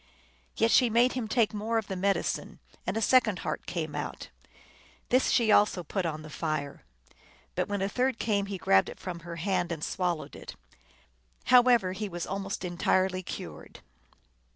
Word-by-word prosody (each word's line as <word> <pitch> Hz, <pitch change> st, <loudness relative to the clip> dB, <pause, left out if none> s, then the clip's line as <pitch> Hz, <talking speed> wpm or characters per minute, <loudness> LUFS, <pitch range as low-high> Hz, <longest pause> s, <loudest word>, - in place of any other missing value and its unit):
Yet 225 Hz, +1 st, +3 dB
she 250 Hz, -2 st, +5 dB
made 240 Hz, +3 st, +3 dB
him 250 Hz, -4 st, -3 dB
take 220 Hz, -1 st, +2 dB
more 220 Hz, +2 st, -1 dB
of 220 Hz, -, -1 dB
the 195 Hz, -, -5 dB
medicine, 195 Hz, +2 st, -1 dB, 0.3 s
and -, -, -1 dB
a 225 Hz, -, 0 dB
second 235 Hz, -6 st, +4 dB
heart -, -, -3 dB
came 160 Hz, -4 st, -3 dB
out. -, -, -5 dB, 0.8 s
This 255 Hz, +2 st, +3 dB
she 230 Hz, -3 st, +3 dB
also 205 Hz, -4 st, +4 dB
put 180 Hz, +2 st, -2 dB
on 155 Hz, -1 st, -5 dB
the 155 Hz, -, -10 dB
fire. 155 Hz, -4 st, -3 dB, 0.7 s
But -, -, -1 dB
when 200 Hz, -1 st, -1 dB
a -, -, +1 dB
third 250 Hz, +3 st, 0 dB
came 200 Hz, -4 st, 0 dB
he 195 Hz, -1 st, -4 dB
grabbed 95 Hz, -, +3 dB
it -, -, -10 dB
from 180 Hz, -2 st, -6 dB
her 170 Hz, +1 st, -8 dB
hand, 175 Hz, 0 st, -1 dB
and 160 Hz, -2 st, -4 dB
swallowed 175 Hz, -4 st, -2 dB
it. -, -, -9 dB, 0.9 s
How 250 Hz, 0 st, +7 dB
ever, 240 Hz, -7 st, +3 dB
he 205 Hz, +2 st, -4 dB
was 175 Hz, -1 st, -4 dB
almost 195 Hz, -1 st, -4 dB
entirely 185 Hz, +1 st, +1 dB
cured. 180 Hz, -, -8 dB
195 Hz, 175 wpm, -29 LUFS, 175-225 Hz, 0.9 s, How